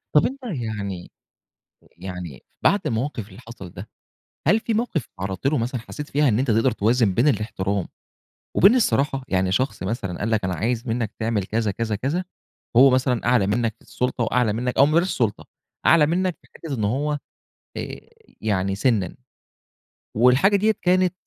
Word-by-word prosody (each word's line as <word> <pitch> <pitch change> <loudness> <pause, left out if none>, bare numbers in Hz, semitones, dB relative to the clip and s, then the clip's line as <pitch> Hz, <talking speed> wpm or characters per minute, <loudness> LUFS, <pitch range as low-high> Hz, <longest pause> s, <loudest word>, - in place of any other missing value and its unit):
طب 150 - +6
أنت 270 +2 -3
يعني 110 - -4 0.9
يعني 90 -6 -7 0.2
بعد 205 - +4
الموقف 115 -2 -2
اللي 100 +2 -13
حصل 115 -7 -10
ده، - - -10 0.6
هل 220 - +5
في 225 - -2
موقف 215 - -1
اتعرّضت 95 +7 -2
له 150 - +2
مثلًا 120 0 -2
حسّيت 150 +6 -8
فيها 145 +1 +2
إن 110 0 +2
أنت 130 -2 +1
تقدر 115 +4 +3
توازن 110 -1 +2
بين 120 +9 +2
الاحترام 100 - -1 0.7
وبين 200 +7 +6
الصراحة؟ 140 - +1
يعني 95 -1 +1
شخص 110 -2 -1
مثلًا 100 -3 -3
قال 110 +2 -1
لك 110 -2 +1
أنا 95 0 -1
عايز 120 +3 -2
منّك 115 -2 -1
تعمل 110 -2 0
كذا، 110 0 -1
كذا، 110 +1 -2
كذا 140 - -1 0.5
هو 135 +3 +8
مثلًا 125 -2 +1
أعلى 120 -5 +3
منّك 110 +1 0
في - - -26
السُلطة 125 -1 -2
وأعلى 115 -1 +1
منّك 125 +3 -2
أو 140 - +7
ما 150 - 0
بلاش 170 +3 +3
السُلطة، 115 - -1 0.4
أعلى 160 -3 +6
منّك 180 +2 0
في - - -24
حتّة 155 -4 -6
إن 110 -4 -2
هو 145 +7 0 0.6
آآ، - - -5 0.4
يعني 95 -3 0
سنًّا، 100 -4 0 1.0
والحاجة 125 - +5
دِيَّة 215 +2 +3
كانت 185 0 +3
120 Hz, 170 wpm, -23 LUFS, 105-145 Hz, 1.0 s, هو